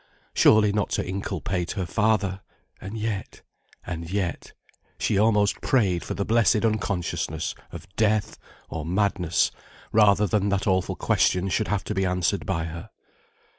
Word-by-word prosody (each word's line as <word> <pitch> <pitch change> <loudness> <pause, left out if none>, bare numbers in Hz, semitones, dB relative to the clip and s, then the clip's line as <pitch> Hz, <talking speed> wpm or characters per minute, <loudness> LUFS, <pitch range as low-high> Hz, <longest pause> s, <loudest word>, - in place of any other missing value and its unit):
Surely 105 -2 +5
not 105 -2 0
to - - -1
inculpate 95 -2 -3
her 95 -3 -2
father 100 -2 +1 0.4
and 100 +3 -6
yet 110 -2 -4 0.4
and 85 -1 -5
yet 95 -2 -3 0.5
she - - 0
almost 105 0 +2
prayed 95 -10 +2
for - - -5
the 100 - -2
blessed 115 -1 +3
unconsciousness 90 -7 -1 0.2
of - - -9
death 110 -2 +1 0.3
or 80 - -5
madness, 90 -1 +1 0.4
rather 105 -1 +5
than 100 -1 +1
that 100 0 0
awful 95 -3 +1
question 90 +1 +1
should 110 +3 0
have 105 -2 -1
to - - -3
be 95 -1 0
answered 90 0 0
by 85 -4 -1
her. 80 +1 -7
100 Hz, 145 wpm, -25 LUFS, 90-105 Hz, 0.5 s, Surely